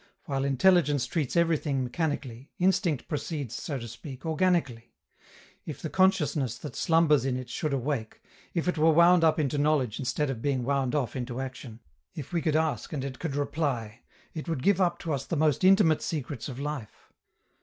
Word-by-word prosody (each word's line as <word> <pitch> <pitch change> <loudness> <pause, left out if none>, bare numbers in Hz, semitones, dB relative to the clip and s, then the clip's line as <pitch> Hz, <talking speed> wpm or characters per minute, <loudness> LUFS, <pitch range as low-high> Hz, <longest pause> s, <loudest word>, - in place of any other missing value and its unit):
While 135 -4 -1
intelligence 145 0 +3
treats 155 -7 -2
everything 155 -5 +1
mechanically, 135 -3 -3
instinct 180 - +1
proceeds, 150 -5 -4
so 140 +3 -4
to 120 -2 -7
speak, 130 +4 -10
organically. 160 -9 0 0.7
If 145 -3 -7
the 155 - -5
consciousness 150 - +2
that 150 - -8
slumbers 160 -5 +3
in 130 -1 -1
it 125 -1 -7
should 155 - -2
awake, 135 -4 -2 0.4
if 170 0 -1
it 180 -3 0
were 160 +1 +5
wound 170 +1 +6
up 160 -1 +4
into 145 -1 0
knowledge 145 -6 +1
instead 135 +2 -1
of 115 -4 -6
being 135 -2 0
wound 135 +1 0
off 130 -7 -1
into 125 -1 -4
action, 125 -3 -7 0.3
if 150 +3 -7
we 170 - +1
could 155 -2 0
ask 160 -1 0
and 140 -3 -3
it 130 -2 -6
could 160 -5 -3
reply, 135 -6 -2 0.3
it 160 +1 -6
would 150 -6 -2
give 195 -1 +3
up 175 -2 +2
to 165 - -2
us 135 -1 -2
the - - -3
most 150 -1 +2
intimate 185 -5 +5
secrets 145 -6 -4
of 125 - -7
life. 145 -6 -6
145 Hz, 185 wpm, -28 LUFS, 130-160 Hz, 0.7 s, wound